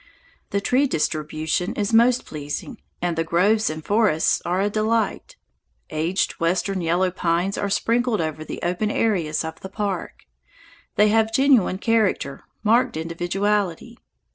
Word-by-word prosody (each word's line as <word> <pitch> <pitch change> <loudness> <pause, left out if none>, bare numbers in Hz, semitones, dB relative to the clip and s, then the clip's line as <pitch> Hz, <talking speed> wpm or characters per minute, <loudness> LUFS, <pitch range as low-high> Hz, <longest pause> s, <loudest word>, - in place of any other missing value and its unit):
The 200 - 0
tree 255 +7 +2
distribution 155 - -1
is 205 +1 -1
most 240 +2 +4
pleasing, 150 - -6 0.2
and 175 -1 0
the 165 - 0
groves 200 +7 +2
and 155 0 -6
forests 205 -7 +2
are 180 +2 -1
a 200 - +2
delight. 215 0 -1 0.6
Aged 165 +5 -1
Western 185 +3 0
yellow 175 +2 +1
pines 175 +2 0
are 200 - -2
sprinkled 230 +3 +1
over 155 -1 -3
the - - -7
open 180 +5 0
areas 175 -9 0
of 160 - -7
the 190 - -8
park. 200 -1 -4 0.7
They 210 +1 +5
have 220 +1 +2
genuine 255 -8 +3
character, 210 -10 0 0.2
marked 225 -4 +2
individuality. 185 +6 -2
195 Hz, 140 wpm, -23 LUFS, 165-220 Hz, 0.7 s, They